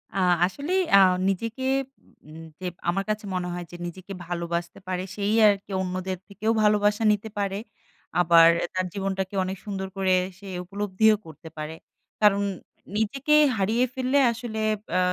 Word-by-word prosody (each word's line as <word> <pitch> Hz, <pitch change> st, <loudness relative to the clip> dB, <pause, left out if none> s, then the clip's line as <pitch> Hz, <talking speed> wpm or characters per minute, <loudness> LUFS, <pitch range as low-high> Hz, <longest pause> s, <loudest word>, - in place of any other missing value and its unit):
আ -, -, -1 dB, 0.3 s
আসলেই 290 Hz, -, -1 dB
আ -, -, +10 dB, 0.3 s
নিজেকে 230 Hz, +6 st, -3 dB, 0.6 s
উম 160 Hz, +1 st, -10 dB, 0.2 s
যে 185 Hz, -, -7 dB, 0.2 s
আমার 195 Hz, +3 st, 0 dB
কাছে 215 Hz, 0 st, -2 dB
মনে 180 Hz, -1 st, -2 dB
হয় 175 Hz, 0 st, -4 dB
যে -, -, -9 dB
নিজেকে 185 Hz, +3 st, -8 dB
ভালোবাসতে 170 Hz, 0 st, -4 dB
পারে 185 Hz, -1 st, -2 dB
সেই 205 Hz, +1 st, 0 dB
আর 205 Hz, -, +6 dB
কি -, -, -13 dB
অন্যদের 185 Hz, 0 st, -3 dB
থেকেও 210 Hz, +2 st, -1 dB
ভালোবাসা 210 Hz, +1 st, +3 dB
নিতে 210 Hz, +1 st, -2 dB
পারে, 200 Hz, -1 st, -1 dB, 0.6 s
আবার 165 Hz, -1 st, +7 dB, 0.2 s
তার 185 Hz, 0 st, 0 dB
জীবনটাকে 195 Hz, 0 st, -3 dB
অনেক 190 Hz, +1 st, -4 dB
সুন্দর 195 Hz, -2 st, -4 dB
করে 190 Hz, -1 st, +1 dB, 0.3 s
সে 200 Hz, -, -14 dB, 0.2 s
উপলব্ধিও 205 Hz, +3 st, +2 dB
করতে 160 Hz, 0 st, -11 dB
পারে। 155 Hz, +1 st, -5 dB, 0.5 s
কারণ 205 Hz, -1 st, +5 dB, 0.6 s
নিজেকে 275 Hz, +8 st, 0 dB, 0.2 s
হারিয়ে 220 Hz, +5 st, +2 dB
ফেললে 260 Hz, +1 st, 0 dB
আসলে 230 Hz, -1 st, -5 dB, 0.4 s
আ -, -, +4 dB
195 Hz, 150 wpm, -25 LUFS, 185-215 Hz, 0.6 s, আ